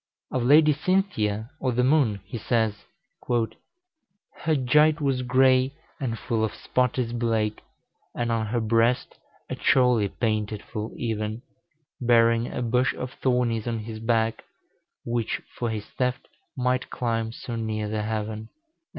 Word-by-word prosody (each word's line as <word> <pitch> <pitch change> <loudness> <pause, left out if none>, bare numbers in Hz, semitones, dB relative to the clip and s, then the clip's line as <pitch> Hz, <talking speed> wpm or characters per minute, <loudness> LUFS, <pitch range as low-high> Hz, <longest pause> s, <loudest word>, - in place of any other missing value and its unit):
Of 130 - 0
Lady 150 +5 +6
Cynthia, 130 - 0
or 130 -2 0
the 125 +1 +2
moon, 130 -8 +3
he 115 - -6
says, 110 -2 0 0.4
"Her 190 - -4
gite 150 +4 +4
was 135 -3 0
gray 130 +1 +3 0.2
and 120 -5 -2
full 110 -1 -1
of 110 - -1
spottis 125 -1 0
blake, 115 -3 0 0.5
And 120 0 -1
on 110 -1 0
her 120 +3 0
brest 115 +2 +1 0.3
a - - -4
chorle 125 -6 +3
painted 110 -2 -1
ful 110 +1 -5
even, 110 0 -3 0.6
Bering 115 -1 +4
a 125 - -3
bush 125 +2 +1
of 125 0 -5
thornis 125 -3 +1
on 115 -1 -1
his 110 0 -6
backe, 115 0 0 0.6
Whiche 115 -1 -1 0.2
for 120 - -2
his 110 -2 -4
theft 125 0 -2 0.3
might 125 0 0
clime 115 -2 -1
so 120 +1 -6
ner 110 -2 -2
the 105 0 -2
heaven." 110 0 -3
120 Hz, 140 wpm, -26 LUFS, 110-130 Hz, 0.6 s, Lady